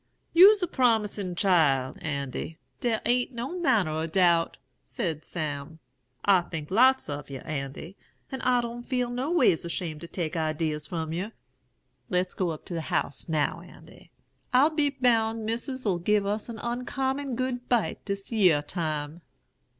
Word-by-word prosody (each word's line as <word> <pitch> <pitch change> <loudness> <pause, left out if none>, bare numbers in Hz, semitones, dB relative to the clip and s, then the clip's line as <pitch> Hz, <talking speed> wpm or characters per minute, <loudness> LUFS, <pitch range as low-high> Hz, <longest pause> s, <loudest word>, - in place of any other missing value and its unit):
"'You's 390 +3 +8
a - - +1
promisin' 215 - +1
chile, 155 -9 +3
Andy, 140 +1 -4 0.2
der 230 -3 0
a'n't 245 +2 +1
no 260 +10 -4
manner 215 - +2
o' 160 +1 -2
doubt,' 170 -1 +3 0.3
said 155 - -3
Sam. 155 -1 -5 0.5
'I 195 -3 +5
think 155 -1 -6
lots 260 +6 +5
of 145 -1 -5
yer, 135 -2 -6
Andy; 145 +5 -6 0.4
and 265 - -4
I 250 -1 +3
don't 235 0 -5
feel 250 -1 -1
no 255 +4 -2
ways 315 - +3
ashamed 170 -2 -3
to 170 - -7
take 170 -1 -4
idees 155 -1 -1
from 160 -3 -3
yer. 195 +6 -4 0.8
Let's 180 -2 0
go 185 -2 -1
up 155 -2 -6
to - - -5
the 165 - -2
house 140 - -2
now, 155 -2 0
Andy. - - -16 0.4
I'll 270 +5 +5
be 300 -2 +2
boun' 230 -4 +1
Missis'll 230 -4 -2
give 205 +3 +2
us 210 +3 -2
an 230 - -6
uncommon 265 +3 -2
good 250 0 -3
bite 240 -4 0
dis 200 +1 -5
yere 180 -10 +4
time.'" 155 -1 -3
195 Hz, 160 wpm, -27 LUFS, 160-245 Hz, 0.8 s, You's